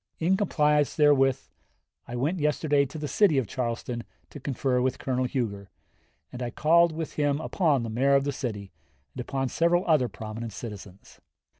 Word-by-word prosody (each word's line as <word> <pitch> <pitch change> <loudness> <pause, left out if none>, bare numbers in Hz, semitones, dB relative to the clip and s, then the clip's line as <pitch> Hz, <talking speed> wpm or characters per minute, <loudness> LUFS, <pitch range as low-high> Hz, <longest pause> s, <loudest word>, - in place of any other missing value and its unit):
In 175 +4 +2
compliance 150 -7 +2
therewith 135 -3 +4 0.7
I 120 - -6
went 150 +9 -1
yesterday 150 -1 +1
to 155 - -9
the 150 -1 -4
city 180 -3 +3
of 130 - +1
Charleston 120 0 -3 0.3
to 145 - -9
confer 130 -1 -1
with 130 0 0
Colonel 130 -1 -1
Huger, 105 -7 -3 0.6
and 125 - -7
I 120 - -2
called 170 +6 +4
with 160 0 -5
him 145 -1 +1
upon 155 -5 +1
the 115 - -4
Mayor 135 +5 +3
of 140 - +3
the 145 - -1
city, 105 -8 -5 0.4
and 130 - -5
upon 135 +1 -2
several 170 +4 +2
other 155 -7 +3
prominent 110 +2 -7
citizens. 100 -4 -10
135 Hz, 170 wpm, -27 LUFS, 120-150 Hz, 0.7 s, therewith